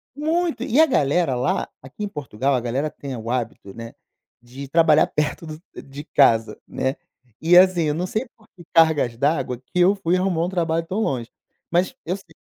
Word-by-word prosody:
Muito. 320 0 -1
E 260 - +1
a 320 - +8
galera 150 - +1
lá 125 +2 -1
Aqui 135 +11 -9
em - - -1
Portugal, 140 - -2
a 130 - +2
galera 125 +5 -2
tem 140 -3 -8
o 115 -1 -7
hábito, 115 -5 -4
né, 115 +1 -9 0.5
de 130 +4 -10
trabalhar 155 0 +4
perto 150 +2 -2
do 155 0 -8 0.2
de 140 +1 -10
casa, 115 -7 +2
né. 130 +1 -2 0.5
E, 170 +2 +5
assim, 180 -2 +5
eu 150 - 0
não 175 +3 -2
sei 220 +7 -3
por 220 - -24
que 175 - -14
cargas 155 -8 +3
d'água 140 -3 0
que 130 +8 -5
eu 185 +3 +5
fui 180 -3 0
arrumar 180 -3 0
um 180 - -3
trabalho 165 -3 -1
tão 190 +6 -3
longe, 125 - -2 0.4
mas 175 +2 +1
eu 180 - -1
sei. 185 -5 -15
155 Hz, 195 wpm, -22 LUFS, 130-180 Hz, 0.5 s, a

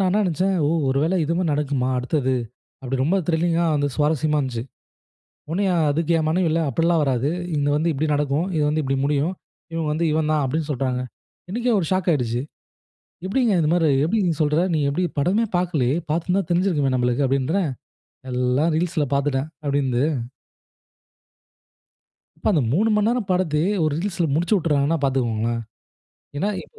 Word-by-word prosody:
நான் 190 -1 +2
என்ன - - +3
நெனைச்சேன், 185 +3 0
ஒ - - +2 0.2
"ஒருவேளை 150 +7 +1
இதுமாரி 170 +4 0
நடக்குமா? 145 -3 -1
அடுத்தது?" 130 0 0 0.5
அப்புடி 135 0 -3
ரொம்ப 165 +8 +2
த்ரில்லிங்கா, 170 0 +1
வந்து 145 0 +1
சுவாரசியமா 150 0 +1
இருந்துச்சு. 130 -5 -2 0.9
ஒடனே 195 +4 0 0.3
அதுக்கு 165 +3 -1
என் 155 -1 0
மனைவி, 175 +2 +1
"இல்ல 165 - +1
அப்டீல்லாம் 165 +4 +2
வராது. 135 +1 0 0.3
இங்கு 145 0 +1
வந்து 165 +2 +1
இப்டி 155 +3 -1
நடக்கும். 145 +4 0
இது 150 - +2
வந்து 155 +1 0
இப்டி 135 0 -1
முடியும். 150 +5 0 0.4
இவன் 160 -2 -1
வந்து, 165 +3 0
இவன் 155 0 0
தான்" 150 -2 +2
அப்டீன்னு 155 +3 -2
சொல்றாங்க. 130 -2 -1 0.5
எனக்கே 240 +2 0
ஒரு 165 - -2
ஷாக் 185 -1 +1
ஆயிருச்சு. 120 -4 -1 0.8
எப்டீங்க 225 +3 +1
இந்த 150 - +1
மாரி, 165 -3 +3 0.2
"எப்டி 220 +7 +1
நீ - - +2
சொல்ற? 150 +2 +2
நீ 155 - +1
எப்டி 165 +6 -1 0.2
படமே 195 +10 +2
பாக்கலையே. 155 -7 0 0.2
பாத்திருந்தா 180 +4 0
தெரிஞ்சுருக்குமே 170 -7 +1
நம்மளுக்கு?" 125 +2 +1
அப்டீன்றேன். 145 +7 0 0.6
"எல்லாம் 125 +6 +1
ரீல்ஸ்ல 165 -4 0
பாத்துட்டேன்" 140 +1 0 0.2
அப்டீன்னுது. 135 -3 +1 2.3
இப்ப - - -10
அந்த 150 -6 +2
3 220 +5 +2 0.2
நேரம் 240 -4 -1
படத்தயே, 180 -1 +1
ஒரு 155 - +1
ரிலீஸ்‌ல 180 -2 -1
முடிச்சு 175 +7 +1
விட்டுறாங்கன்னா 155 -2 +1
பார்த்துக்கோங்களேன். 115 -3 0 0.7
ஏன்னா 200 +8 0
எ - - -13
155 Hz, 155 wpm, -22 LUFS, 140-175 Hz, 2.3 s, என்ன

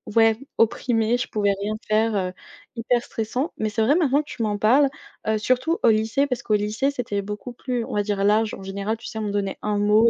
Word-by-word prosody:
ouais, 225 -1 +5 0.2
opprimée. 230 0 +2
Je 245 - -3
pouvais 205 -2 +1
rien 210 +1 -1 0.2
faire, 215 +1 +2
heu, 185 -2 -1 0.4
hyper 240 +1 +1
stressant. 245 +8 -3
Mais 215 - -1
c'est 220 +1 -1
vrai, 265 +7 +4
maintenant 290 -5 +3
que 300 - -16
tu - - -6
m'en 210 -1 0
parles, 255 +8 +5 0.4
heu, 220 0 +2
surtout 255 +9 +1
au - - +6
lycée, 220 +5 +2
parce 250 -4 -3
qu'au 215 - -1
lycée, 210 +6 +1
c'était 240 -7 -2
beaucoup 210 +5 -6
plus, 245 0 -3
on - - -5
va 205 - +2
dire, 200 -1 -1
large. 215 +2 +3
En 195 - -8
général, 200 +3 -2
tu 225 - -10
sais, 220 - -7
on 215 - -2
me 205 - -2
donnait 200 -1 -2
un 210 -1 -1
mot 210 +3 +5
220 Hz, 240 wpm, -23 LUFS, 210-245 Hz, 0.4 s, au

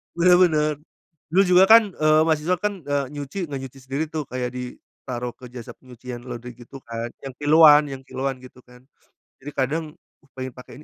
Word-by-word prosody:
Bener 175 +1 +5
bener, 155 -4 +3 0.6
dulu 185 +5 +4
juga 180 +1 +7
kan, 225 -2 +7
eee, 155 -2 +3
mahasiswa 160 +2 +1
kan, 205 +1 -3
eee, 145 -1 0
nyuci 145 +3 -7
nggak 140 - -3
nyuci 135 0 -10
sendiri 140 +4 -3
tuh, 155 0 -4
kayak 125 -1 -2
ditaruh 125 -1 -7
ke 125 -2 -13
jasa 120 -2 -9
penyucian 125 -1 -10
laundry 120 -1 -8
gitu 125 +3 -12
kan 115 0 -5
yang 135 -2 -8
kiloan 150 0 +7
yang 135 - -6
kiloan 135 0 -3
gitu 125 0 -15
kan, 125 0 -18 0.6
jadi 140 +2 -8
kadang, 140 +5 -1 0.5
pengen 130 -1 -5
pakai 125 +1 -14
135 Hz, 175 wpm, -23 LUFS, 125-155 Hz, 0.6 s, juga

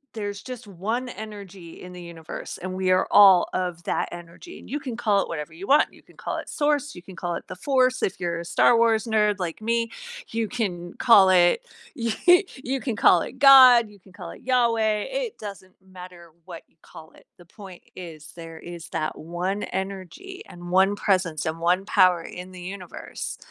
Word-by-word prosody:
there's 205 -2 -5
just 250 -2 -9
1 215 +7 -4
energy 200 -6 -10
in 180 - -10
the 180 0 -10
universe 165 -2 -8
and 185 +1 -5
we 185 0 -1
are 185 0 +3
all 195 -4 +7
of 180 -2 -3
that - - -1
energy, 175 - -11
and - - -15
you 290 - -3
can 255 -5 -6
call 210 -4 +1
it - - -4
whatever 155 -1 -6
you 175 +5 -10
want. 290 +2 +4
You - - -18
can - - -23
call - - -5
it - - -7
source, 290 -1 -1
you 175 - -10
can 185 0 -14
call 175 0 -3
it - - -9
the 185 - -6
force, 255 +3 +1
if 190 - -1
you're 170 -2 -3
a 170 - -7
Star 235 +7 +3
Wars 230 -1 +3
nerd 210 -2 +2
like 175 +1 -5
me, 230 +1 -1 0.4
you 225 -1 -2
can 180 -7 -4
call 205 -6 +5
it, 180 - +4 0.3
you 230 -2 -2 0.4
you 265 0 -4
can 245 -3 -3
call - - +5
it - - -8
God, 255 -5 +8
you 205 -1 -18
can 190 0 -21
call 180 -4 -9
it - - -13
Yahweh. 230 -4 +1
It - - -4
doesn't 195 -3 -10
matter 180 -2 -13
what 170 -3 -10
you - - -38
call 160 0 -14
it. - - -22
The 175 - -17
point 190 0 -13
is 160 -4 -10
there 165 -1 -9
is 170 0 -10
that 155 -1 -3
1 180 +5 -4
energy 195 - -6
and 175 0 -10
1 190 +2 +3
presence 185 -6 0
and 160 0 -3
1 175 +3 +1
power 185 -4 +3
in 180 +2 -9
the 180 - -10
universe, 185 -1 -7
190 Hz, 205 wpm, -24 LUFS, 175-230 Hz, 0.4 s, God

